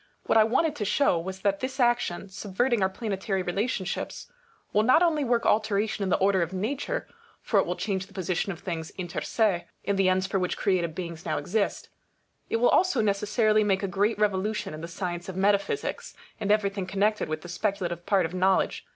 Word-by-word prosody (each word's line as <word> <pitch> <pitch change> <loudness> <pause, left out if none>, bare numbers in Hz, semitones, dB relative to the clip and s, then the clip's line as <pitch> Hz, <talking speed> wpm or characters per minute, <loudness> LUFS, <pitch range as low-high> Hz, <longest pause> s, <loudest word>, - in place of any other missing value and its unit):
What - - +1
I - - +8
wanted 290 +8 +1
to 210 - -2
show 205 -3 +2
was, 190 +3 -6
that 200 -1 +1
this 260 +3 -4
action, 240 -7 +1
subverting 210 +5 -1
our 190 - +3
planetary 195 -2 -2
relationships, 195 - -3 0.4
will 210 - +4
not 255 +9 +5
only 315 -4 +2
work 240 -2 +1
alteration 215 -1 +1
in 195 - 0
the - - +3
order 190 -1 +3
of 170 +2 -2
nature; 220 +10 -2 0.3
for - - +1
it - - +1
will - - -1
change 190 -3 -2
the 195 - -19
position 185 0 -1
of 170 - -8
things 165 -4 -4
inter 175 -2 -4
se, 205 -6 +1 0.2
and 200 -1 0
the 190 -1 +4
ends 185 0 +2
for 195 0 -1
which 180 -1 -1
created 175 -5 0
beings 170 -2 -6
now 155 -2 -1
exist; 195 +8 -1 0.6
it - - 0
will 245 +1 +4
also 365 -8 +3
necessarily 215 +1 +2
make 195 -1 +1
a - - +1
great 200 +4 +1
revolution 210 -1 0
in 155 - -7
the 165 - -5
science 175 0 -4
of 185 - -6
metaphysics, 200 - 0 0.2
and 205 -2 0
everything 200 -3 +1
connected 205 +1 0
with 155 0 -3
the - - -8
speculative 175 -2 -2
part 195 -3 +3
of 165 - -5
knowledge. 190 +1 +1
195 Hz, 205 wpm, -27 LUFS, 185-215 Hz, 0.6 s, I